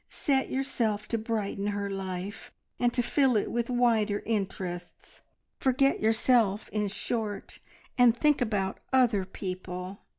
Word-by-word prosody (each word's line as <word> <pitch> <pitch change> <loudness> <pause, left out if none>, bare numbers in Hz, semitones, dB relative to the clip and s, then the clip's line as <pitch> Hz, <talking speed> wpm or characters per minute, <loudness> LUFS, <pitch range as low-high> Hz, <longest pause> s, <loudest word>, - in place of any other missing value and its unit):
Set 270 -2 0
yourself 230 -6 -1
to 230 - -1
brighten 215 -3 -2
her 205 -1 -2
life, 195 0 -5 0.3
and 245 0 +3
to 245 0 0
fill 265 -2 +3
it 205 - -1
with 235 0 -1
wider 230 -4 +2
interests; 185 -5 -4 0.4
forget 275 +1 +2
yourself, 220 -1 +2
in 210 -1 -1
short, 210 +1 -4 0.4
and 240 -1 +6
think 295 +1 +3
about 205 -5 -1
other 240 -7 +3
people. 185 0 -6
215 Hz, 130 wpm, -28 LUFS, 195-245 Hz, 0.4 s, and